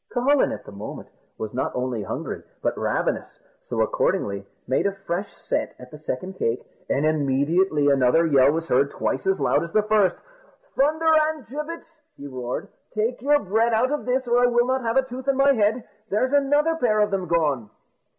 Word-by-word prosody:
Cucullin 265 Hz, +3 st, +2 dB
at -, -, -7 dB
the -, -, -10 dB
moment 100 Hz, +1 st, -8 dB, 0.3 s
was 110 Hz, -1 st, -5 dB
not 130 Hz, -, -1 dB
only 125 Hz, -3 st, -2 dB
hungry, 100 Hz, -, -5 dB, 0.2 s
but -, -, 0 dB
ravenous, -, -, -2 dB, 0.2 s
so -, -, -6 dB
he -, -, +4 dB
accordingly 100 Hz, -1 st, -1 dB, 0.2 s
made 130 Hz, +9 st, +1 dB
a 200 Hz, -, -2 dB
fresh 180 Hz, +4 st, -2 dB
set -, -, -3 dB
at 125 Hz, 0 st, -13 dB
the 150 Hz, -, -9 dB
second 155 Hz, +5 st, -4 dB
cake, 115 Hz, +2 st, -1 dB, 0.2 s
and 140 Hz, +3 st, +1 dB
immediately 150 Hz, +2 st, +2 dB
another 140 Hz, +4 st, +4 dB
yell 140 Hz, -3 st, +5 dB
was 165 Hz, +2 st, -3 dB
heard 140 Hz, +1 st, +3 dB
twice 135 Hz, -, -2 dB
as 190 Hz, 0 st, +2 dB
loud -, -, +2 dB
as 170 Hz, -, -7 dB
the 215 Hz, -, +3 dB
first. 210 Hz, -4 st, +3 dB, 0.6 s
"Thunder 315 Hz, +3 st, +3 dB, 0.2 s
and 310 Hz, -5 st, -6 dB
gibbets!" 320 Hz, +4 st, -7 dB, 0.2 s
he 140 Hz, -, -9 dB
roared, 125 Hz, -3 st, -5 dB, 0.3 s
"take 225 Hz, +3 st, -1 dB
your 290 Hz, +3 st, +4 dB
bread 220 Hz, +4 st, +1 dB
out 245 Hz, +5 st, +2 dB
of 295 Hz, -, -2 dB
this, 255 Hz, +1 st, +1 dB
or 240 Hz, +1 st, +3 dB
I 245 Hz, -, +5 dB
will 240 Hz, 0 st, +3 dB
not 260 Hz, +1 st, 0 dB
have 230 Hz, +1 st, 0 dB
a 265 Hz, -, +5 dB
tooth 260 Hz, +1 st, -8 dB
in 275 Hz, -1 st, +2 dB
my 275 Hz, 0 st, +5 dB
head; 220 Hz, 0 st, +1 dB, 0.3 s
there's 255 Hz, +7 st, 0 dB
another 290 Hz, +3 st, +3 dB
pair 220 Hz, -8 st, +2 dB
of 210 Hz, -1 st, +2 dB
them 190 Hz, -2 st, -1 dB
gone!" 150 Hz, -9 st, 0 dB
205 Hz, 200 wpm, -24 LUFS, -, 0.6 s, yell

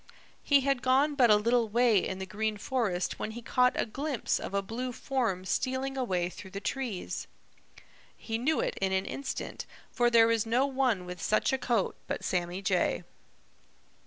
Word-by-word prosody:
He 285 Hz, -1 st, +4 dB
had 275 Hz, -2 st, +1 dB
gone 270 Hz, +4 st, +3 dB
but 255 Hz, -4 st, +4 dB
a 210 Hz, -, +8 dB
little 230 Hz, +2 st, +2 dB
way 235 Hz, -1 st, +4 dB
in 190 Hz, -, -3 dB
the 190 Hz, -, -5 dB
Green 215 Hz, +2 st, -2 dB
Forest 205 Hz, -6 st, -1 dB
when 220 Hz, -, -4 dB
he 240 Hz, -, -8 dB
caught 250 Hz, +2 st, +2 dB
a -, -, +2 dB
glimpse 275 Hz, +2 st, -2 dB
of -, -, -6 dB
a 200 Hz, -, +1 dB
blue 245 Hz, +5 st, -4 dB
form 230 Hz, -8 st, -2 dB
stealing 260 Hz, +7 st, -1 dB
away 185 Hz, -10 st, 0 dB
through 190 Hz, +2 st, -10 dB
the 195 Hz, +1 st, -6 dB
trees. 230 Hz, -3 st, -4 dB, 0.9 s
He 225 Hz, 0 st, -3 dB
knew 305 Hz, +6 st, +1 dB
it -, -, -2 dB
in 190 Hz, -1 st, +1 dB
an 190 Hz, 0 st, +1 dB
instant, 275 Hz, -1 st, -5 dB, 0.2 s
for 240 Hz, -1 st, +2 dB
there 230 Hz, -1 st, +5 dB
is 225 Hz, -2 st, +2 dB
no 240 Hz, +4 st, +2 dB
one 260 Hz, -9 st, 0 dB
with 180 Hz, -1 st, -7 dB
such 215 Hz, -, +1 dB
a -, -, +2 dB
coat 235 Hz, -5 st, 0 dB
but -, -, -3 dB
Sammy 180 Hz, +1 st, -2 dB
Jay. 185 Hz, -2 st, +1 dB
230 Hz, 185 wpm, -30 LUFS, 195-260 Hz, 0.9 s, a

